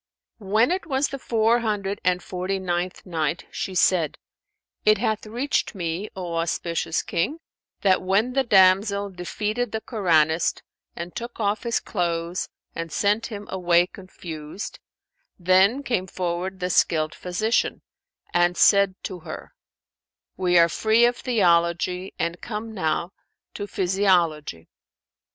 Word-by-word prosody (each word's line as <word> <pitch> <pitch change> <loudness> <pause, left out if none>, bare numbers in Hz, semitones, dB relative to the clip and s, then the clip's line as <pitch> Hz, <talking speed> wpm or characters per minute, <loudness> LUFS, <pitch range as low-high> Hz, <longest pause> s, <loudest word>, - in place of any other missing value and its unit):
When 215 - +2
it 365 -2 -2
was 275 -1 +1
the 275 - -6
Four 230 0 +2
Hundred 205 -3 -2
and 180 -1 +1
Forty 185 +1 -3
ninth 180 -1 -3
Night, 165 -1 -2
She 190 - -4
said, 175 -4 +2 0.7
It 215 0 +5
hath 220 0 -1
reached 240 +1 -1
me, 175 +3 -3
O 175 -3 -4
auspicious 165 0 -1
King, 275 - -1 0.4
that 190 -2 +3
when 200 +7 +1
the 270 0 +2
damsel 200 -1 +4
defeated 210 +6 -3
the 220 - -2
Koranist 165 - +1 0.3
and 170 +1 -7
took 235 0 -6
off 205 -1 0
his 235 -1 0
clothes 170 -2 -2 0.2
and 165 -1 -5
sent 210 +3 +1
him 205 -2 -7
away 175 -2 +3
confused, 175 -2 -8 0.6
then 190 +9 +4
came 215 -8 -1
forward 185 +1 -3
the 180 0 -1
skilled 155 -2 +2
physician 200 +6 -1 0.5
and 175 0 +3
said 200 -2 +5
to 185 -2 -5
her, - - -9 0.8
"We 180 -1 +2
are 170 0 +7
free 220 +7 +3
of 240 0 +1
theology 180 -4 +1
and 170 +1 -2
come 220 0 -5
now 170 -1 -1 0.4
to 205 - -5
physiology. 175 - +1
190 Hz, 135 wpm, -24 LUFS, 175-215 Hz, 0.8 s, are